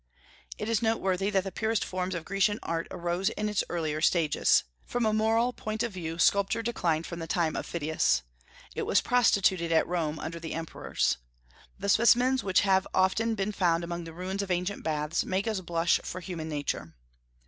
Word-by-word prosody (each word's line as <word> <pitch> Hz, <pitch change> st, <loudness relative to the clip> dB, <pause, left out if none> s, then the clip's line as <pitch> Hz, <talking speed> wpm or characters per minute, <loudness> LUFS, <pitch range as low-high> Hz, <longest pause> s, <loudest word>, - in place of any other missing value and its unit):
It 210 Hz, -, -4 dB
is 230 Hz, -1 st, +1 dB
noteworthy 195 Hz, -4 st, +1 dB
that 195 Hz, -2 st, +1 dB
the 195 Hz, -, -5 dB
purest 220 Hz, +1 st, 0 dB
forms 185 Hz, 0 st, -3 dB
of 165 Hz, -1 st, -5 dB
Grecian 200 Hz, +2 st, +1 dB
art 165 Hz, 0 st, -2 dB
arose 175 Hz, +3 st, -1 dB
in 210 Hz, -1 st, -3 dB
its 210 Hz, -2 st, 0 dB
earlier 155 Hz, -3 st, -2 dB
stages. 165 Hz, -3 st, +3 dB, 0.2 s
From 245 Hz, -1 st, -1 dB
a 215 Hz, -, +2 dB
moral 225 Hz, +3 st, +2 dB
point 215 Hz, -1 st, -3 dB
of 235 Hz, -, -2 dB
view, 165 Hz, -3 st, -5 dB
sculpture 200 Hz, +5 st, +2 dB
declined 170 Hz, -9 st, 0 dB
from 170 Hz, -, -6 dB
the 165 Hz, -, -5 dB
time 165 Hz, -1 st, 0 dB
of -, -, -4 dB
Phidias. 160 Hz, -, +1 dB, 0.5 s
It -, -, -3 dB
was -, -, +4 dB
prostituted 190 Hz, -8 st, +2 dB
at 160 Hz, -, +4 dB
Rome 160 Hz, -3 st, -2 dB
under 165 Hz, +2 st, -5 dB
the 165 Hz, -1 st, -5 dB
emperors. 165 Hz, -, -1 dB, 0.6 s
The -, -, -4 dB
specimens 245 Hz, +5 st, +4 dB
which 190 Hz, -2 st, +3 dB
have 190 Hz, -1 st, +2 dB
often 220 Hz, +5 st, +2 dB
been 200 Hz, 0 st, -1 dB
found 175 Hz, -4 st, +1 dB
among 170 Hz, 0 st, -4 dB
the 165 Hz, -, -9 dB
ruins 185 Hz, +3 st, -3 dB
of 200 Hz, -, -5 dB
ancient 180 Hz, +2 st, -1 dB
baths 150 Hz, 0 st, -1 dB
make 190 Hz, +3 st, -1 dB
us 215 Hz, -4 st, -1 dB
blush 170 Hz, -1 st, +1 dB
for 185 Hz, -, -5 dB
human 170 Hz, -3 st, -6 dB
nature. 145 Hz, -, -3 dB
185 Hz, 190 wpm, -28 LUFS, 165-210 Hz, 0.6 s, was